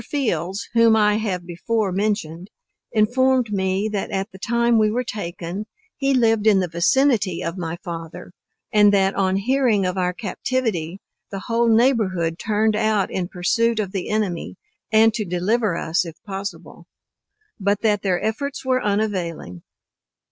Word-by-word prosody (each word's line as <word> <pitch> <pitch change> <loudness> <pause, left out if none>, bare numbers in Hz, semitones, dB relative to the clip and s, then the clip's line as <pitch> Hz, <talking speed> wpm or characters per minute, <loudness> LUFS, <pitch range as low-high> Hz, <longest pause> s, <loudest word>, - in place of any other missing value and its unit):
Fields, 200 - -2
whom 230 -1 +5
I 210 -1 +3
have 190 -5 -3
before 200 +4 -1
mentioned, 190 -3 -2 0.4
informed 245 +2 +2
me 190 +1 0
that 205 -2 -3
at 195 +2 -3
the 190 - -13
time 235 +1 +2
we 215 -1 +3
were 245 +4 -1
taken, 190 -2 -5 0.3
he 275 -1 0
lived 225 -4 +3
in 205 -3 +5
the 185 - 0
vicinity 200 - +2
of 165 +1 -3
my 170 -2 -4
father; 170 0 -7 0.4
and 210 -1 +6
that 195 0 +2
on 190 -1 +1
hearing 230 -1 +2
of 185 +1 -1
our 180 0 +1
captivity, 200 -3 -3 0.3
the 195 -1 -6
whole 230 +2 +1
neighborhood 210 -9 +2
turned 215 0 +1
out 215 -2 +1
in 180 -2 -2
pursuit 225 +6 0
of 200 -3 -2
the 190 -3 -4
enemy, 210 -5 -2 0.4
and 220 0 +5
to 215 - -2
deliver 190 +2 0
us 165 +3 0
if 165 -3 -8
possible: 190 -4 -7 0.7
but 200 0 0
that 210 -3 +2
their 185 -3 0
efforts 275 +6 -3
were 255 -1 +1
unavailing. 185 - -2
205 Hz, 155 wpm, -22 LUFS, 180-225 Hz, 0.7 s, and